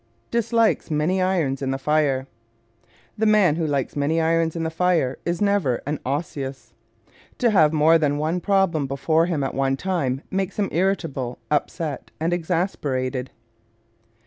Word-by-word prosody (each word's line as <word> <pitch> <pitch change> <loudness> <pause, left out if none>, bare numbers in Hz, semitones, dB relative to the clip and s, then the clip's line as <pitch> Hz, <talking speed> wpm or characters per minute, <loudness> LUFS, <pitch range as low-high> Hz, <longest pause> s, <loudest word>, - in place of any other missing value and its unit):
Dislikes 230 -3 +1
Many 160 +5 +1
Irons 165 -8 0
in 135 - -1
the 135 - -1
Fire 140 -2 +1 0.6
¶ - - -35 0.3
The 220 - +3
man 205 -7 +4
who 165 -2 0
likes 140 -3 -1
many 150 +3 +1
irons 165 0 +1
in 165 - -2
the 160 - -2
fire 165 -6 +1
is 170 +3 0
never 200 -12 +1
an 145 +1 -2
Osseous. 135 -4 -4 0.6
To 240 -2 +2
have 160 -7 +5
more 160 +1 +4
than 145 -2 +1
one 160 +4 -1
problem 190 -8 +1
before 160 +5 +1
him 160 -6 -1
at 135 - -2
one 135 0 0
time 145 -8 -1
makes 190 0 -2
him 205 -2 0
irritable, 165 -9 -1
upset 150 0 -2
and 165 +2 0
exasperated. 145 -7 -2
160 Hz, 155 wpm, -23 LUFS, 140-180 Hz, 0.6 s, have